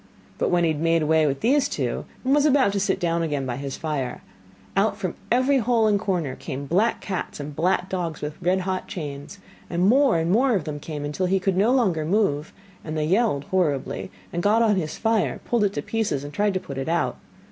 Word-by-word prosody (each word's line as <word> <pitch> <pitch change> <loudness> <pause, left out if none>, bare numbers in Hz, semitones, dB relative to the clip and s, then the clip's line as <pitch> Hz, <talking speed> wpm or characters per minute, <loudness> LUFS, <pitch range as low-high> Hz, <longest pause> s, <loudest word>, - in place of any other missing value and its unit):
But - - +1
when 175 -1 +2
he 165 - +3
had 150 -1 -3
made 165 -1 +2
away 155 0 +3
with 135 -1 -2
these 275 +4 +3
two, - - -2 0.2
and 265 - +3
was 295 +1 +4
about 270 -7 +4
to 200 - 0
sit 195 0 0
down 170 -2 0
again 145 -4 -1
by 125 -1 -3
his 140 -1 -5
fire, 140 -6 -3 0.5
out 205 +3 +2
from 185 -4 -3 0.2
every 260 +3 +3
hole 230 -1 +2
and 210 -2 +3
corner 175 -10 -1
came 140 -2 -6
black 190 +11 +1
cats 190 -6 -4
and 145 0 -6
black 180 +3 +1
dogs 175 -4 -3
with 150 +2 -6
red 185 +2 +2
hot 185 0 -3
chains, 145 +2 -6 0.3
and 175 +2 +1
more 265 -1 +4
and 165 +1 0
more 245 +3 +3
of 185 - 0
them 150 -1 -5
came 150 -1 -5
until 150 +6 -1
he 190 +1 +2
could 190 0 0
no 205 +6 +3
longer 195 -12 +2
move, 160 -4 0 0.3
and 155 0 -4
they 155 - 0
yelled 190 -4 +2
horribly, 170 -4 0 0.2
and 175 - -1
got 215 +5 +3
on 215 -2 +3
his 160 -5 -3
fire, 225 -1 +1
pulled 235 -3 +1
it 200 - 0
to - - -3
pieces, 220 -11 -1
and 145 0 -8
tried 205 +3 +1
to - - +1
put 140 -6 -7
it 135 - -3
out. 170 +1 0
180 Hz, 230 wpm, -24 LUFS, 150-210 Hz, 0.5 s, was